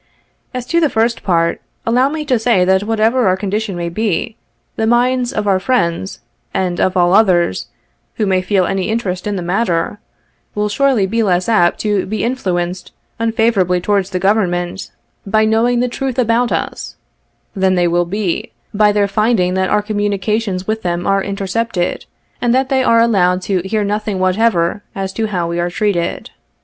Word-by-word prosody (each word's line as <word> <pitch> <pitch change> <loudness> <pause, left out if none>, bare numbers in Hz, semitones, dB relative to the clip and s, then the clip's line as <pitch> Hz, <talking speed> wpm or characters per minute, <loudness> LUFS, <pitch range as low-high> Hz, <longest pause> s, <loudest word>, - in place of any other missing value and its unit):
As 250 -1 -5
to 335 +6 +1
the 315 -3 +2
first 230 0 0
part, 170 -3 0 0.2
allow 250 +4 +3
me 305 0 -4
to 255 -5 +1
say, 220 -5 +2
that 190 +1 +3
whatever 225 +3 +1
our 185 0 +2
condition 205 0 -2
may 175 0 -3
be, 215 +4 -2 0.4
the 220 - 0
minds 245 +1 +2
of 210 - -2
our 195 -2 +2
friends, 190 -5 -1 0.3
and 180 -2 -1
of 185 0 +1
all 175 0 +3
others, 180 - +3 0.5
who 215 - 0
may 190 -2 +2
feel 185 0 +1
any 195 +1 -1
interest 205 -5 -2
in 205 - -1
the 180 - -3
matter, 180 0 -1 0.6
will 210 0 0
surely 245 -1 +2
be 225 +4 0
less 180 -4 +1
apt 195 -7 +3
to 205 -3 0
be 215 +3 -2
influenced 185 -7 -2 0.3
unfavorably 225 -5 +1
towards 200 0 0
the 185 - -2
government 180 -2 0 0.4
by 215 +2 +3
knowing 235 +2 +2
the 250 - +1
truth 260 +1 -4
about 240 0 +2
us, - - -3 0.6
than 190 -1 +2
they 175 -1 +2
will 175 +1 +1
be 190 0 -3 0.2
by 210 0 +4
their 205 -1 +2
finding 200 -3 +1
that 190 0 0
our 210 - +2
communications 205 -1 -1
with 220 +2 -2
them 175 -2 -2
are 195 0 +2
intercepted, 200 -1 -2 0.4
and 240 0 +2
that 265 0 +1
they 265 -1 +2
are 230 -2 +4
allowed 185 -6 +3
to 190 -3 0
hear 210 +2 0
nothing 210 0 -2
whatever 185 -1 +1
as 195 -1 -4
to 220 -1 -1
how 180 -5 -2
we 170 0 -3
are 175 0 0
treated. 180 -2 -2
205 Hz, 180 wpm, -16 LUFS, 185-225 Hz, 0.6 s, by